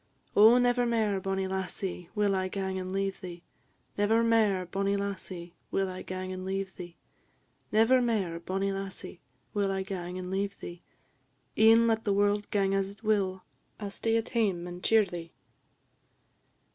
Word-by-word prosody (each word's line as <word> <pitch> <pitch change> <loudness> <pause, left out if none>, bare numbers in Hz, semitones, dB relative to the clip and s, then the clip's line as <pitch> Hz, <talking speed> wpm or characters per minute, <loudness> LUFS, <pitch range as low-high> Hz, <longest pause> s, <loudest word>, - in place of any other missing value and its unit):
"Oh, 220 +4 +8
never 245 0 +3
mair, 215 -4 +1
bonnie 195 0 -1
lassie, 190 -2 -4
will 205 -2 +2
I 185 0 0
gang 190 0 -3
and 185 0 -5
leave 195 0 -2
thee! 175 -1 -8 0.6
Never 220 +3 +3
mair, 215 -5 +3
bonnie 195 +2 0
lassie, 185 -3 -5 0.2
will 195 -1 0
I 185 - -7
gang 185 0 -5
and 185 0 -6
leave 190 0 -3
thee; 175 -2 -9 0.7
Never 225 +4 +5
mair, 200 -8 0
bonnie 195 +3 -1
lassie, 195 -2 -6 0.3
will 200 -2 +1
I 190 0 -1
gang 180 -2 -5
and 185 0 -5
leave 200 +1 -2
thee; 175 0 -8 0.7
E'en 225 +1 +6
let 225 -1 +1
the 205 - +1
world 205 +1 +1
gang 195 -1 +1
as 195 0 0
it 200 +2 -14
will, 195 -3 +1 0.4
I 210 - -5
'll - - -3
stay 225 +3 0
at 225 +1 -2
hame 195 -7 0
and 180 0 -8
cheer 225 -1 +5
ye." 175 -4 -7
195 Hz, 170 wpm, -29 LUFS, 185-210 Hz, 0.7 s, Oh